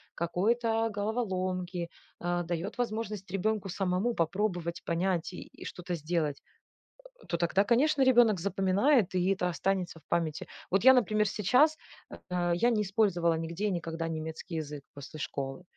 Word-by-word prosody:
какой-то 225 +7 +1
головоломки, 185 -5 -2 0.3
а, 175 0 -1
дает 175 +2 -4
возможность 215 -4 -3
ребенку 200 +1 -1
самому 190 +5 0
попробовать, 175 0 -1
понять 175 0 0
и - - -7 0.2
и - - -5
что-то 180 0 -5
сделать, 155 -2 -2 0.8
э, - - -16
то 170 - -1
тогда, 175 +3 +2
конечно, 270 +6 +3
ребенок 240 -6 +5
запоминает 195 - +2
и 185 +2 +3
это 180 -2 -1
останется 180 -1 -1
в - - -30
памяти. 160 -2 -1 0.2
Вот 195 +2 +2
я, 260 - +10
например, 215 -4 +2
сейчас, 250 +11 +3 0.5
а, 175 -1 +1
я 235 +8 +3
не 225 -3 +2
использовала 190 -4 +2
нигде 165 +5 -3
и 210 - +1
никогда 165 -2 -3
немецкий 160 +2 -5
язык 145 -2 -8
после 140 +2 -9
школы, 140 +2 -4
185 Hz, 150 wpm, -30 LUFS, 170-215 Hz, 0.8 s, я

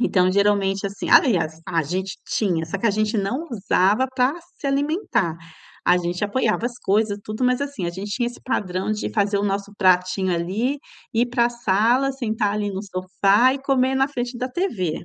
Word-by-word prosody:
então, 185 -6 +3
geralmente, 200 0 +2
assim 200 0 -6
aliás, 165 - +4
a 165 -3 0
gente 185 +5 -4
tinha, 175 -6 0
só 165 - -3
que 230 - 0
a - - +4
gente 215 +2 0
não 240 +12 -2
usava 205 +2 +2
para 255 +3 +2 0.3
se 280 - -4
alimentar. 275 - 0 0.5
A 180 - +5
gente 175 +2 -3
apoiava 230 +1 0
as 240 - -6
coisas, 205 +1 +1
tudo, 215 +3 -5
mas, 250 +1 +2
assim, 275 -11 -4
a - - -1
gente 195 +4 -7
tinha 240 +3 -1
esse 240 - -7
padrão 190 -6 -2
de 215 - -3
fazer 205 -2 +1
o 205 - -1
nosso 200 0 -2
pratinho 185 0 +2
ali, 200 +11 -1 0.4
ir 235 +2 +3
para 240 -1 +3
sala, 240 +4 +2
sentar 220 -5 -1
ali 205 -1 -2
no 195 0 -4
sofá 195 +5 +2
e 275 - -4
comer 265 -1 +2
na 270 0 +3
frente 245 -2 -4
da 255 - -2
TV. 200 - -2
210 Hz, 190 wpm, -22 LUFS, 190-245 Hz, 0.5 s, A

